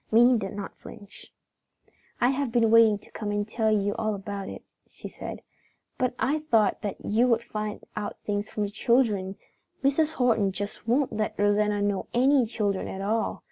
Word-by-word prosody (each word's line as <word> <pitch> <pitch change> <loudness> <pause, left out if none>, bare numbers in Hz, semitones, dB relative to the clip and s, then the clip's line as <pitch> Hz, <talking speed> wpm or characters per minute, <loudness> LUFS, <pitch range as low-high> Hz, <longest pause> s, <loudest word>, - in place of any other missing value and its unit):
Minnie 240 +2 +6
did 195 -1 -5
not 205 -1 -6
flinch. 205 -2 -13 0.9
"I 245 - +4
have 275 -2 -1
been 230 -2 +3
wanting 225 -2 +6
to - - -19
come 210 -1 -5
and 205 0 -1
tell 220 0 0
you 205 -1 +1
all 215 -1 0
about 195 0 -6
it," - - -9 0.2
she - - -10
said, - - -8 0.6
"but 255 -2 0
I 295 +4 +1
thought 225 -10 +2
that 205 -3 -5
you 230 +4 +3
would 235 -1 +2
find 210 -2 -5
out 210 -1 -4
things 205 0 -2
from 210 - -2
the 200 - -3
children. 210 -4 +1 0.5
Mrs. 300 +3 +2
Horton 225 -8 +2
just 205 +3 -6
won't 260 +4 +2
let 215 0 -2
Rosanna 205 0 +2
know 205 -2 -1
any 260 0 +4
children 205 -4 -1
at 190 - -5
all. 220 +3 -1
215 Hz, 180 wpm, -27 LUFS, 205-240 Hz, 0.9 s, Minnie